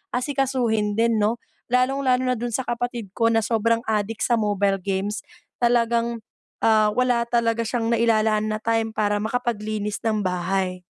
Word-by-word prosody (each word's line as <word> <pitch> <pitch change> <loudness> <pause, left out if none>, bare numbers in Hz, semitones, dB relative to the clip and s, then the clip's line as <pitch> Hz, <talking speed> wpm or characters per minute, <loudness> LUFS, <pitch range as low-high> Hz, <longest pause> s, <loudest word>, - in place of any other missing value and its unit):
asikasuhin 250 -6 0
din 230 -1 +2
‘no. 215 +3 +2 0.3
Lalong-lalo 255 0 +2
na - - +1
dun 240 0 -3
sa 260 - 0
kapatid 240 -4 -3
ko 230 - +2
na 225 0 +2
sobrang 230 0 +1
addict 215 +1 -1
sa 240 - +1
mobile 200 -2 +1
games, 195 +2 -2 0.4
talagang, 235 -1 +1 0.4
ah, 215 -1 +4
wala 245 -2 +2
talaga 230 -1 +1
siyang 230 0 -1
nailalaan 220 -2 +2
na - - -1
time 225 0 0
para 210 -1 +1
makapaglinis 215 -3 -2
ng 215 -2 +1
bahay. 185 0 -1
225 Hz, 150 wpm, -23 LUFS, 210-240 Hz, 0.4 s, ah